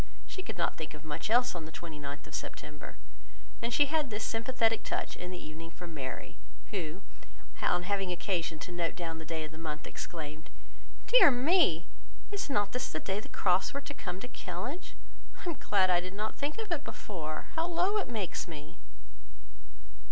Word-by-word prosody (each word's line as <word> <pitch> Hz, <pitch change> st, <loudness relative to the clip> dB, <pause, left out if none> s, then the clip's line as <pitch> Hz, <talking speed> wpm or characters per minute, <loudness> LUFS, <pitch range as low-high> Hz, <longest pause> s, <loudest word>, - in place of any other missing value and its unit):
She 375 Hz, -, -5 dB
could 275 Hz, -, -5 dB
not 170 Hz, -, +1 dB
think 155 Hz, -1 st, -4 dB
of 150 Hz, +1 st, -11 dB
much 150 Hz, +6 st, -2 dB
else 245 Hz, +2 st, +5 dB
on 170 Hz, -3 st, -4 dB
the 160 Hz, -, -8 dB
29th 150 Hz, -4 st, -6 dB
of -, -, -12 dB
September; 150 Hz, 0 st, -5 dB, 0.6 s
and 235 Hz, -, 0 dB
she 290 Hz, -, +7 dB
had 300 Hz, -1 st, +2 dB
this 215 Hz, 0 st, -2 dB
sympathetic 225 Hz, -1 st, +2 dB
touch -, -, -1 dB
in 180 Hz, -, -5 dB
the 180 Hz, -, -4 dB
evening 165 Hz, 0 st, -7 dB
from 170 Hz, 0 st, -8 dB
Mary, 130 Hz, -4 st, -4 dB, 0.3 s
who, 180 Hz, -1 st, -2 dB, 0.6 s
on 175 Hz, -, +3 dB
having 195 Hz, -1 st, +1 dB
occasion 175 Hz, -2 st, 0 dB
to -, -, -7 dB
note 175 Hz, -1 st, 0 dB
down 165 Hz, -2 st, -3 dB
the 160 Hz, -, -6 dB
day 160 Hz, -1 st, -1 dB
of 155 Hz, -, -5 dB
the 160 Hz, -, -9 dB
month, 155 Hz, -2 st, -3 dB
exclaimed, 155 Hz, 0 st, -5 dB, 0.6 s
"Dear -, -, +9 dB
me, 255 Hz, -, +5 dB, 0.5 s
is 405 Hz, -6 st, -1 dB
not 205 Hz, -6 st, +3 dB
this 250 Hz, -, 0 dB
the 155 Hz, -, -1 dB
day 195 Hz, +4 st, 0 dB
the -, -, -9 dB
Crofts 180 Hz, +8 st, +3 dB
were 280 Hz, -, 0 dB
to 290 Hz, +1 st, -6 dB
come 185 Hz, -9 st, -4 dB
to -, -, -4 dB
Kellynch? 245 Hz, -, -4 dB, 0.5 s
I -, -, +1 dB
am 335 Hz, -, -1 dB
glad 190 Hz, -3 st, +4 dB
I 175 Hz, -, +6 dB
did 185 Hz, +2 st, -5 dB
not 215 Hz, +1 st, -1 dB
think 290 Hz, +2 st, -1 dB
of 440 Hz, -4 st, -4 dB
it 335 Hz, -, +1 dB
before. 155 Hz, -6 st, -4 dB
How 325 Hz, +1 st, +2 dB
low 355 Hz, +4 st, +3 dB
it 405 Hz, -, 0 dB
makes 215 Hz, -7 st, -1 dB
me!" 150 Hz, -3 st, -8 dB
185 Hz, 195 wpm, -33 LUFS, 160-250 Hz, 0.6 s, Dear